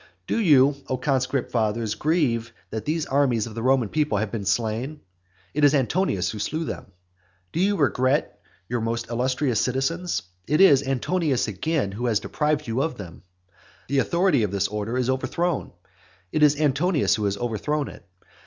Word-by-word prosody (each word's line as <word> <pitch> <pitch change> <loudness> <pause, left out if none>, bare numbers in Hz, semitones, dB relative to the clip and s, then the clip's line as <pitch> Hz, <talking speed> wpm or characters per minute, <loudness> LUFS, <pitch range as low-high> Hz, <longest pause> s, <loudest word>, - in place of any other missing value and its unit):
Do - - -1
you, 145 - +5
O 130 - 0
conscript 130 -1 -1
fathers, 110 -1 0
grieve 120 -4 0 0.2
that 110 -1 -4
these 155 +1 -1
armies 130 -5 +1
of 115 - -8
the 115 - -5
Roman 130 -1 +3
people 150 -4 0
have 105 0 -2
been 110 -4 -4
slain? 120 +8 -1 0.5
It 150 - 0
is 145 0 +6
Antonius 130 - +1
who 105 - -7
slew 155 +9 -2
them. - - -6 0.7
Do - - -2
you 200 +3 +3
regret 135 -3 +1 0.3
your 120 -1 -2
most 115 +1 -3
illustrious 125 0 0
citizens? 135 - -1 0.2
It 150 +3 +2
is 145 -9 +7
Antonius, 140 +1 0
again, 110 - -1
who 120 +5 -3
has 110 -3 +2
deprived 150 0 -1
you 115 +3 0
of 160 -4 -2
them. 85 -6 -9 0.7
The 140 0 +2
authority 170 -1 +2
of 105 - +1
this 100 0 0
order 105 +3 -3
is 125 -1 0
overthrown; 130 +6 -1 0.6
it 155 - 0
is 150 -1 +5
Antonius 150 +2 +2
who 105 - 0
has 100 0 0
overthrown 120 +6 -2
it. - - -11
130 Hz, 170 wpm, -24 LUFS, 115-150 Hz, 0.7 s, is